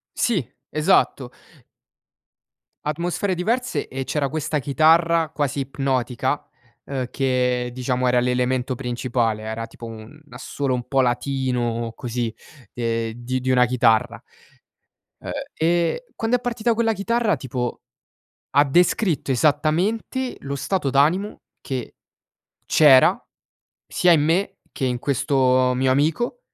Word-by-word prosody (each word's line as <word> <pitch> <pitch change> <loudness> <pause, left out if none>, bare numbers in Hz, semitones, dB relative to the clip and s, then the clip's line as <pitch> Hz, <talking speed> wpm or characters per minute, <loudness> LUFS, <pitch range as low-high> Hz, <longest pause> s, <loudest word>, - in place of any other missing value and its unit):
Sì, 185 - 0 0.2
esatto. 155 -5 +2 1.6
Atmosfere 175 +5 -1
diverse 235 +8 -1
e 135 0 -4
c'era 140 0 -1
questa 155 +1 -2
chitarra, 160 +4 +3
quasi 145 -1 -2
ipnotica, 130 -2 -2 0.4
ehm, 130 -2 -3
che 125 -2 0
diciamo 125 0 -1
era 125 0 +3
l'elemento 125 +1 0
principale. 120 -3 -1
Era 110 +1 -4
tipo 115 - -11
un 115 +6 -11
assolo 130 +1 -3
un 120 -1 -4
po' 135 -1 +1
latino 120 -2 -1
così, 120 -2 -3 0.4
ehm, 115 -1 -2
di 120 +2 -4
di 130 +1 -2
una 125 -1 +5
chitarra, 120 -3 +2 1.0
ehm. - - -8 0.2
E 170 - 0
quando 225 +2 +1
è - - -12
partita 235 -1 0
quella 225 0 +1
chitarra 220 0 0
tipo 125 -2 -4 0.7
ha 145 +2 +5
descritto 170 - +1
esattamente 175 - 0
lo 140 0 -5
stato 175 +2 -1
d'animo 155 +10 +1 0.2
che 130 -3 -5 0.7
c'era 140 -4 +5 0.6
sia 180 -1 +3
in 155 - +4
me 170 +6 +1
che 135 - -4
in 125 -1 0
questo 130 -1 +2
mio 130 +1 +1
amico 160 - 0
135 Hz, 120 wpm, -22 LUFS, 125-165 Hz, 1.6 s, una